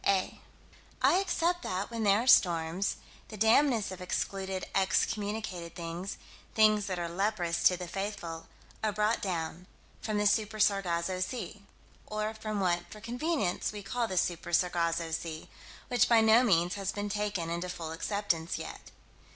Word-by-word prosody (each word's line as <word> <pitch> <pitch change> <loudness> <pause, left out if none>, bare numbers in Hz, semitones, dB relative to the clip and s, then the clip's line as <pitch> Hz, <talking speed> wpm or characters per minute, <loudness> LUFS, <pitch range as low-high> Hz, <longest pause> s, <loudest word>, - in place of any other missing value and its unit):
8 190 -2 +1 0.6
I - - +6
accept 350 -2 0
that, 190 - -3
when 230 -1 -3
there 205 +1 +4
are - - -5
storms, 175 -4 +4 0.3
the 215 - -9
damnedest 225 0 +3
of 185 0 -8
excluded, 190 +1 -2
excommunicated 195 -2 -1
things 170 +3 -5 0.4
things 215 -1 +4
that 185 -2 -2
are 175 -1 -2
leprous 175 -1 -1
to 180 - +6
the 180 -1 -6
faithful 190 -3 -5 0.4
are 215 - +2
brought 210 +2 +1
down 175 -1 -3 0.3
from 215 -1 -2
the 210 - +1
Super 215 +1 +2
Sargasso 185 -3 +1
Sea 210 +1 -4 0.5
or 215 +1 -2
from 215 -1 -4
what 175 -2 0
for 215 - -10
convenience 240 - -1
we 210 -1 -7
call 240 +3 -1
the 185 - -4
Super 175 0 -1
Sargasso 170 -1 +1
Sea 160 -1 -4 0.4
which 245 - +3
by 230 -1 +6
no 220 +2 +6
means 180 -6 +3
has 195 -1 -2
been 205 0 -3
taken 205 -5 -2
into 170 +2 -3
full 165 -3 -5
acceptance 170 -1 -1
yet. - - -8
195 Hz, 160 wpm, -30 LUFS, 175-215 Hz, 0.6 s, I